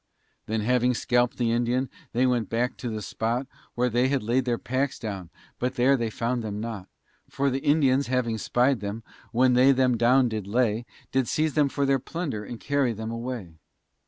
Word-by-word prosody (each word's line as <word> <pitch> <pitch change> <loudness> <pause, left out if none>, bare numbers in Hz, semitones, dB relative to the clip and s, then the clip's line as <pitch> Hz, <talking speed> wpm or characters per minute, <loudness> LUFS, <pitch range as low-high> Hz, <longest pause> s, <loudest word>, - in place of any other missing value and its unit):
Then 110 0 -1
having 125 +2 +2
scalp'd 120 +1 +1
the 120 -2 +1
Indian, 120 +3 +1 0.2
they 125 +2 +2
went 120 -4 +1
back 120 +2 0
to 125 - -4
the 110 -1 -4
spot 115 +6 -2 0.3
Where 125 +1 +2
they 125 +2 +2
had 135 -2 0
laid 125 +4 +1
their 120 -2 0
packs 130 +3 -1
down, 100 -6 -6 0.3
but 125 +1 -1
there 130 +3 +4
they 120 -3 -1
found 120 +3 -2
them 105 -2 -4
not, 110 -4 -5 0.4
For 140 0 0
the 135 - -1
Indians 140 -2 +3
having 120 -3 0
spy'd 125 +4 +2
them, 105 +2 -5 0.3
when 125 +2 +4
they 130 +2 +6
them 130 -2 +2
down 125 +3 +4
did 110 -4 -4
lay, 115 +1 +1 0.2
Did 130 -2 +1
seize 155 -2 0
them 150 -2 +3
for 140 +1 0
their 135 -1 +2
plunder, 140 -7 -4
and 115 +2 -8
carry 140 -4 +1
them 110 +1 -5
away. 115 -9 -6
125 Hz, 195 wpm, -26 LUFS, 115-130 Hz, 0.4 s, they